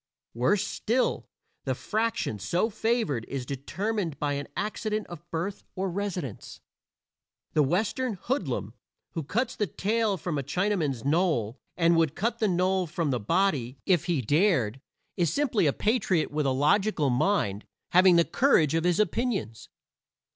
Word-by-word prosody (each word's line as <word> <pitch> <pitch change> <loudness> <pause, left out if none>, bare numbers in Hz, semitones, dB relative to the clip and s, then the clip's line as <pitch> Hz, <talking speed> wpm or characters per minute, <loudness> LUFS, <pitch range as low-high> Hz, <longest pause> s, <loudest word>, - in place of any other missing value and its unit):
Worse 185 - +2
still, 245 +4 0 0.4
the - - 0
fraction 220 - -1
so 175 - 0
favored 220 - 0
is 135 -2 -4
determined 165 - -3
by 145 -1 -1
an 145 0 -4
accident 215 0 -2
of 175 0 -11
birth 175 +5 -3
or 190 0 -2
residence. 180 - -5 0.9
The 150 - +4
Western 215 - 0
hoodlum 260 +9 -2 0.4
who 165 - -3
cuts 235 - -1
the 210 - 0
tail 210 +4 0
from 160 -3 -3
a - - -3
Chinaman's 155 - -1
nowl, 140 - +1 0.2
and 170 0 +4
would 160 -4 +2
cut 230 +3 -1
the 215 - +2
nowl 185 0 +1
from 165 -2 -1
the 125 - 0
body, 140 - 0
if 180 -3 +2
he 170 -7 0
dared, 135 - +2 0.4
is 170 -4 +2
simply 235 - +1
a - - +4
patriot 200 - +1
with 150 -1 0
a - - +3
logical 150 +2 +2
mind, 120 - +1 0.3
having 180 0 +6
the 170 0 +5
courage 170 - +3
of 165 +1 +1
his 180 +1 +2
opinions. 210 - -1
175 Hz, 150 wpm, -27 LUFS, 145-210 Hz, 0.9 s, having